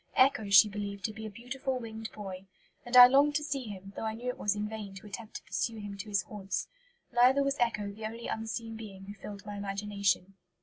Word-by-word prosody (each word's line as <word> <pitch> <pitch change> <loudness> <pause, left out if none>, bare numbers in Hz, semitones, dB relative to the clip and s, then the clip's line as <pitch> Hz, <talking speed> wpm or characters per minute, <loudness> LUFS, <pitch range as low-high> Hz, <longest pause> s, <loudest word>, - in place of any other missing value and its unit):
Echo 260 -6 +4
she 200 +1 +9
believed 200 -1 -4
to 215 - -2
be 220 0 -6
a - - -6
beautiful 255 +5 -4
winged 225 -2 -6
boy; 195 -2 -8 0.4
"and 245 +1 +4
I 250 - +14
longed 280 +3 +5
to 300 - +1
see 280 -4 -2
him, 195 -2 -8
though - - -5
I 220 0 -2
knew 245 +2 -4
it 250 - -4
was 210 0 +1
in 210 0 -2
vain 210 -3 -7
to 190 - -10
attempt 210 +2 -8
to - - -6
pursue 230 -1 -2
him 205 -1 -6
to 205 +2 -7
his 200 -2 +1
haunts; 195 +1 -4 0.5
neither 255 +3 +5
was 275 0 -1
Echo 215 -4 0
the 215 +2 -5
only 230 +1 -8
unseen 225 0 -4
being 200 -4 -9
who 200 - -7
filled 205 0 -9
my 205 -1 -6
imagination." 200 -1 -1
215 Hz, 230 wpm, -31 LUFS, 200-240 Hz, 0.5 s, I